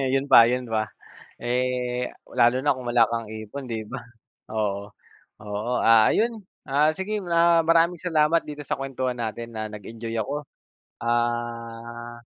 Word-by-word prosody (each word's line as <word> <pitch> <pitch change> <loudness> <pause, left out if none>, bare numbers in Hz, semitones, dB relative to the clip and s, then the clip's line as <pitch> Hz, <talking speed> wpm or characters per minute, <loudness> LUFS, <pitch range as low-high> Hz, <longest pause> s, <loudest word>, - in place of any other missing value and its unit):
Yun 135 +1 +1
pa, 115 - +9
yun 125 +1 0
pa. 110 0 0 0.5
Eh, 125 0 -1 0.3
lalo 120 +2 +5
na 145 0 +2
kung 125 -1 -8
wala 120 -1 +4
kang 115 -1 -2
ipon, 110 +6 -7
'di 110 -2 -4
ba? 125 -2 -6 0.5
Oo. 100 -2 -2 0.5
Oo, 105 +3 -3
ah, 115 -1 +6
ayun. 225 -2 0 0.2
Ah, 145 +3 +3
sige 205 +4 -3
na 170 -1 +4
maraming 170 +1 +4
salamat 165 -1 +2
dito 150 -1 -7
sa 145 - -3
kwentuhan 130 -2 -3
natin 115 0 -4
na 110 0 -3
nag-enjoy 115 +2 -7
ako. 145 +6 -4 0.6
Ah, 120 0 -3
120 Hz, 145 wpm, -25 LUFS, 115-145 Hz, 0.6 s, pa